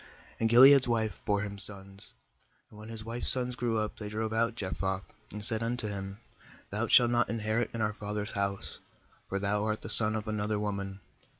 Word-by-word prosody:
2And 115 Hz, -, 0 dB
Gil 120 Hz, +3 st, +6 dB
ead's 135 Hz, -2 st, +5 dB
wife 110 Hz, -2 st, -2 dB
bore 100 Hz, -1 st, -1 dB
him, 100 Hz, 0 st, -8 dB
sons; 100 Hz, 0 st, +6 dB, 0.6 s
and 105 Hz, -, -16 dB
when 110 Hz, -, -12 dB
bis 110 Hz, -1 st, -9 dB
wife's 115 Hz, +1 st, 0 dB
sons 125 Hz, -1 st, +6 dB
grew 120 Hz, -2 st, -3 dB
up, 110 Hz, 0 st, -4 dB
they 105 Hz, -1 st, -7 dB
drove 110 Hz, +1 st, -5 dB
out 115 Hz, +1 st, -1 dB
Jephthah, 95 Hz, -2 st, -4 dB, 0.3 s
and 105 Hz, 0 st, -7 dB
said 110 Hz, -1 st, -2 dB
unto 115 Hz, -1 st, -3 dB
him: 95 Hz, 0 st, -7 dB, 0.5 s
'Thou 110 Hz, +3 st, -2 dB
shalt 120 Hz, 0 st, +4 dB
not 120 Hz, -2 st, 0 dB
inherit 110 Hz, +1 st, -2 dB
in 115 Hz, -, -6 dB
our 105 Hz, 0 st, -2 dB
father's 105 Hz, 0 st, -6 dB
louse; 100 Hz, 0 st, -3 dB, 0.5 s
for 100 Hz, -, -3 dB
thou 100 Hz, +1 st, -2 dB
art 110 Hz, 0 st, -3 dB
the -, -, -8 dB
son 110 Hz, -1 st, +2 dB
of 110 Hz, 0 st, -6 dB
another 105 Hz, 0 st, -3 dB
woman.' 100 Hz, -2 st, -6 dB
105 Hz, 200 wpm, -28 LUFS, 100-115 Hz, 0.6 s, Gil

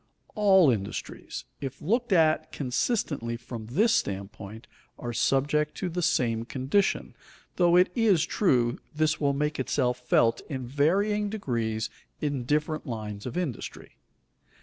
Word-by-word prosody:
All 190 Hz, -, +5 dB
industries, 100 Hz, -4 st, -5 dB
if 135 Hz, -2 st, -6 dB
looked 235 Hz, +7 st, 0 dB
at 160 Hz, -4 st, +3 dB
consistently 130 Hz, -, -1 dB
from 115 Hz, -2 st, -8 dB
this 210 Hz, -, +3 dB
standpoint, 100 Hz, -, -3 dB, 0.3 s
are 120 Hz, 0 st, -5 dB
subject 145 Hz, +5 st, +1 dB
to 185 Hz, -, -3 dB
the 180 Hz, +1 st, -2 dB
same 125 Hz, -10 st, +1 dB
condition, 135 Hz, +11 st, 0 dB, 0.4 s
though 175 Hz, -1 st, +4 dB
it 180 Hz, 0 st, +5 dB
is 200 Hz, -9 st, +3 dB
true 125 Hz, -, +1 dB, 0.2 s
this 155 Hz, 0 st, +1 dB
will 140 Hz, -1 st, +2 dB
make 150 Hz, +1 st, -1 dB
itself 125 Hz, -1 st, 0 dB
felt 115 Hz, -2 st, +2 dB
in 130 Hz, -4 st, -4 dB
varying 200 Hz, -, +1 dB
degrees 115 Hz, -, -2 dB, 0.3 s
in 140 Hz, -5 st, -2 dB
different 150 Hz, +3 st, -1 dB
lines 105 Hz, -2 st, -5 dB
of 125 Hz, -, -5 dB
industry. 165 Hz, -10 st, -5 dB
145 Hz, 130 wpm, -27 LUFS, 120-180 Hz, 0.4 s, All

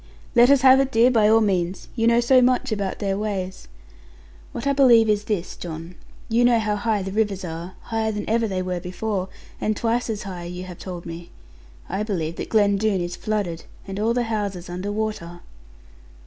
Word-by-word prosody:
'Let 240 Hz, +1 st, +6 dB
us 280 Hz, -2 st, +5 dB
have 265 Hz, 0 st, +8 dB
it, 270 Hz, 0 st, +1 dB
dear, 235 Hz, +2 st, +5 dB
by 220 Hz, -3 st, +4 dB
all 225 Hz, +1 st, +5 dB
means. 185 Hz, -3 st, -1 dB
You 230 Hz, -1 st, +1 dB
know 235 Hz, 0 st, +4 dB
so 255 Hz, +2 st, +5 dB
much 255 Hz, 0 st, +2 dB
about 200 Hz, -3 st, -2 dB
their 195 Hz, -1 st, -2 dB
ways.' 190 Hz, -3 st, -4 dB, 0.8 s
'What -, -, -6 dB
I 280 Hz, -, +2 dB
believe 240 Hz, -5 st, +6 dB
is 210 Hz, -1 st, +1 dB
this, 200 Hz, -6 st, -3 dB
John. 165 Hz, 0 st, -7 dB, 0.3 s
You 235 Hz, +1 st, +2 dB
know 240 Hz, -1 st, +5 dB
how 215 Hz, -2 st, 0 dB
high 215 Hz, -2 st, 0 dB
the 195 Hz, -, -5 dB
rivers 200 Hz, -3 st, -1 dB
are, 170 Hz, +2 st, -7 dB
higher 220 Hz, -1 st, -2 dB
than 210 Hz, -1 st, -5 dB
ever 225 Hz, +1 st, +1 dB
they 185 Hz, -2 st, -2 dB
were 180 Hz, -1 st, -2 dB
before, 185 Hz, +2 st, -3 dB, 0.3 s
and 215 Hz, -1 st, 0 dB
twice 235 Hz, +1 st, 0 dB
as 215 Hz, -2 st, -3 dB
high, 180 Hz, -3 st, -7 dB
you 180 Hz, +1 st, -6 dB
have 180 Hz, -2 st, -10 dB
told 180 Hz, -2 st, -7 dB
me. 170 Hz, 0 st, -8 dB, 0.6 s
I 195 Hz, +3 st, -3 dB
believe 170 Hz, -7 st, -3 dB
that -, -, -5 dB
Glen 205 Hz, -2 st, +3 dB
Doone 210 Hz, -2 st, +1 dB
is 175 Hz, 0 st, -4 dB
flooded, 200 Hz, -6 st, -3 dB, 0.2 s
and 195 Hz, +1 st, -5 dB
all 225 Hz, +2 st, +1 dB
the 245 Hz, -, +1 dB
houses 200 Hz, -6 st, -3 dB
under 185 Hz, +3 st, -4 dB
water.' 205 Hz, -5 st, -4 dB
210 Hz, 205 wpm, -23 LUFS, 185-225 Hz, 0.8 s, have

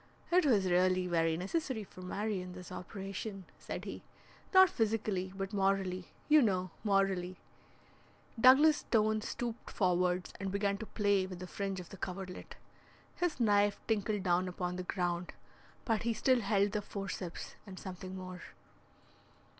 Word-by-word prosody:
"It 355 Hz, -2 st, +5 dB
was 210 Hz, -7 st, +4 dB
really 185 Hz, 0 st, +3 dB
very 165 Hz, -2 st, +1 dB
necessary 225 Hz, -, -2 dB
for 185 Hz, -, -13 dB
Marion, 185 Hz, -1 st, -3 dB
this 180 Hz, 0 st, -10 dB
operation," 195 Hz, 0 st, -6 dB
said -, -, -6 dB
he, -, -, -6 dB, 0.5 s
"not 375 Hz, -1 st, +8 dB
physically, 215 Hz, -, -1 dB
but 195 Hz, +1 st, -4 dB
morally, 195 Hz, -2 st, 0 dB, 0.2 s
you 305 Hz, 0 st, +7 dB
know, 185 Hz, -6 st, +1 dB
morally." 195 Hz, -3 st, +1 dB, 1.0 s
Douglas 285 Hz, +6 st, +7 dB
Stone 215 Hz, -1 st, +1 dB
stooped 235 Hz, +1 st, -4 dB
forwards 180 Hz, -1 st, +1 dB
and 195 Hz, 0 st, -3 dB
began 200 Hz, 0 st, 0 dB
to 220 Hz, -, -6 dB
play 200 Hz, -3 st, +1 dB
with 185 Hz, -1 st, -7 dB
the 180 Hz, -, -6 dB
fringe 195 Hz, +1 st, -3 dB
of 175 Hz, -, -9 dB
the 195 Hz, -, -10 dB
coverlet. 185 Hz, 0 st, -6 dB, 0.6 s
His 350 Hz, -6 st, -1 dB
knife 205 Hz, -3 st, +3 dB
tinkled 210 Hz, -2 st, 0 dB
down 180 Hz, 0 st, +2 dB
upon 180 Hz, 0 st, -3 dB
the 185 Hz, -, -3 dB
ground, 175 Hz, -1 st, -1 dB, 0.5 s
but 225 Hz, -2 st, +1 dB
he 230 Hz, 0 st, 0 dB
still 255 Hz, +3 st, +3 dB
held 200 Hz, -1 st, +2 dB
the 210 Hz, 0 st, -1 dB
forceps 195 Hz, -4 st, -5 dB
and 190 Hz, -1 st, -9 dB
something 185 Hz, 0 st, -7 dB
more. 185 Hz, -1 st, -7 dB
195 Hz, 145 wpm, -33 LUFS, 185-215 Hz, 1.0 s, not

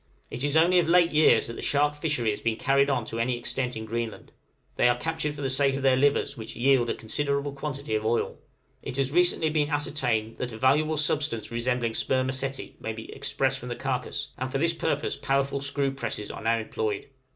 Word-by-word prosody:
It 125 Hz, -, -4 dB
is 145 Hz, +1 st, 0 dB
only 175 Hz, +3 st, +5 dB
of 170 Hz, -, +1 dB
late 170 Hz, 0 st, +5 dB
years 155 Hz, +1 st, +5 dB
that 115 Hz, -, -6 dB
the -, -, -7 dB
shark 145 Hz, +1 st, +2 dB
fishery 150 Hz, -7 st, 0 dB
has 105 Hz, -, -5 dB
been 115 Hz, -1 st, 0 dB
carried 140 Hz, +4 st, +2 dB
on 130 Hz, -3 st, 0 dB
to 115 Hz, -, -5 dB
any 120 Hz, +1 st, 0 dB
extent 125 Hz, +1 st, -3 dB
in 110 Hz, 0 st, -5 dB
Greenland; 115 Hz, 0 st, -4 dB, 0.4 s
they 125 Hz, -, +4 dB
are 120 Hz, -, +2 dB
captured 150 Hz, +2 st, -2 dB
for 145 Hz, -, -6 dB
the -, -, +1 dB
sake 135 Hz, 0 st, +2 dB
of 135 Hz, -, -4 dB
their 135 Hz, -1 st, +5 dB
livers, 140 Hz, +2 st, +2 dB
which 110 Hz, -1 st, -8 dB
yield 130 Hz, 0 st, +3 dB
a -, -, 0 dB
considerable 140 Hz, +4 st, -2 dB
quantity 140 Hz, -3 st, -5 dB
of 110 Hz, 0 st, 0 dB
oil. 115 Hz, +2 st, 0 dB, 0.4 s
It 125 Hz, -, -5 dB
has 135 Hz, -1 st, +1 dB
very 165 Hz, +5 st, +3 dB
recently 170 Hz, -3 st, +3 dB
been 150 Hz, -1 st, +1 dB
ascertained 125 Hz, -7 st, 0 dB
that 125 Hz, -2 st, -4 dB
a -, -, -7 dB
valuable 150 Hz, +6 st, +2 dB
substance 145 Hz, -7 st, 0 dB
resembling 120 Hz, 0 st, 0 dB
spermaceti 130 Hz, +2 st, -1 dB
may 110 Hz, -, -4 dB
be 110 Hz, 0 st, -9 dB
expressed 135 Hz, 0 st, -1 dB
from 125 Hz, -, -8 dB
the 120 Hz, -, -3 dB
carcase, 130 Hz, -1 st, -3 dB
and 130 Hz, 0 st, -3 dB
for 135 Hz, -, 0 dB
this 165 Hz, +4 st, +2 dB
purpose 155 Hz, -3 st, -1 dB
powerful 140 Hz, 0 st, 0 dB
screw 140 Hz, -1 st, 0 dB
presses 115 Hz, -5 st, -4 dB
are -, -, -8 dB
now 115 Hz, +1 st, +2 dB
employed. 110 Hz, -2 st, -3 dB
135 Hz, 220 wpm, -27 LUFS, 120-145 Hz, 0.4 s, only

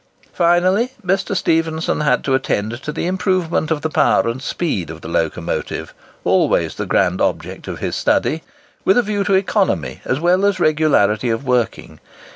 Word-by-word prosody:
Finally, 185 Hz, +8 st, +2 dB
Mr. 195 Hz, +1 st, 0 dB
Stephenson 160 Hz, -2 st, 0 dB
had 150 Hz, -, +2 dB
to 135 Hz, -, 0 dB
attend 120 Hz, -2 st, -1 dB
to 150 Hz, -, -4 dB
the -, -, -3 dB
improvement 185 Hz, -3 st, 0 dB
of 160 Hz, -2 st, 0 dB
the 160 Hz, -, 0 dB
power 115 Hz, -, +3 dB
and 120 Hz, +3 st, -3 dB
speed 140 Hz, -, -2 dB
of 80 Hz, +1 st, -8 dB
the -, -, -8 dB
locomotive—always 85 Hz, 0 st, -1 dB
the -, -, -5 dB
grand -, -, +1 dB
object -, -, -2 dB
of -, -, -5 dB
his -, -, -3 dB
study,—with 270 Hz, -, -1 dB
a 245 Hz, -, +4 dB
view 205 Hz, -1 st, -1 dB
to 195 Hz, -1 st, +2 dB
economy 185 Hz, -, 0 dB
as 130 Hz, -, -1 dB
well 180 Hz, +4 st, +2 dB
as 200 Hz, -2 st, +2 dB
regularity 150 Hz, -, +2 dB
of 115 Hz, +4 st, -2 dB
working. 125 Hz, -3 st, -1 dB
160 Hz, 160 wpm, -19 LUFS, 125-185 Hz, -, a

